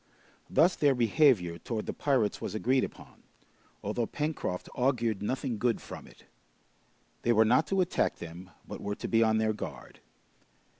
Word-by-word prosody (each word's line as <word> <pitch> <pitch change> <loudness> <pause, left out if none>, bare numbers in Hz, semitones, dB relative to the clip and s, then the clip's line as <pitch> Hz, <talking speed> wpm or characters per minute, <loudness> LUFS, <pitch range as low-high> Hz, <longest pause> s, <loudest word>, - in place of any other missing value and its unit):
Thus 170 +3 +4
their 145 -3 +3
behavior 115 - +3
towards 110 +4 -4
the - - -3
pirates 130 -8 0
was - - -4
agreed 130 +4 +2
upon, - - -9 0.6
although 110 +3 -1
Pencroft 145 - -3
augured 120 -5 0
nothing 125 +1 -2
good 120 -1 +1
from - - -10
it. - - -18 1.0
They 120 - +2
were 110 0 +5
not 125 +8 +3
to 195 -1 +2
attack 180 - +1
them, 85 +2 -9 0.2
but - - -7
were 105 0 -3
to - - -5
be 115 - +3
on 110 -1 +3
their 110 0 +1
guard. 110 - -8
115 Hz, 160 wpm, -30 LUFS, 105-135 Hz, 1.0 s, were